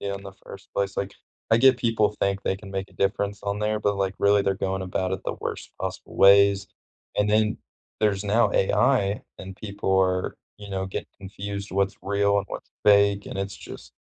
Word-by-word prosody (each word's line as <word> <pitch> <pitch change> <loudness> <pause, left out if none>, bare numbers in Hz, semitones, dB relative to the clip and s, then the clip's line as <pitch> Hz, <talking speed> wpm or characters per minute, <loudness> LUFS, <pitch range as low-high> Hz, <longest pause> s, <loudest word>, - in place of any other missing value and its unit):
media 100 0 -3
in 100 - -11
the 95 -1 -9
first 100 - -11
place? 100 0 -1
Like, 100 0 -3 0.4
I 115 - +6
get 130 +1 +6
people 110 -3 +1
think 100 0 0
they 95 - 0
can 95 -1 -11
make 95 0 -4
a - - -21
difference 100 0 -1
on 100 0 -2
there, 105 0 0
but, 100 -1 +1
like, 95 -1 -1
really, 100 0 +4
they're 100 - +1
going 95 0 -2
about 95 0 -2
it 95 - -2
the - - -3
worst - - -5
possible - - -6
ways, 100 0 +6 0.5
and 105 0 +2
then, 110 0 +2 0.4
there's 105 -2 +1
now 105 +1 +3
AI, 100 0 +2 0.2
and 95 0 -8
people 100 -2 -2
are 95 -1 +1 0.2
you 105 -1 -11
know, 95 0 -2
get 95 - -5
confused 100 +1 -6
what's 100 +1 0
real, 100 0 +2
and 100 - -1
what's - - -8
fake, 100 -1 +4
and - - -6
it's 100 +1 -3
just - - -11
100 Hz, 205 wpm, -25 LUFS, 95-105 Hz, 0.5 s, I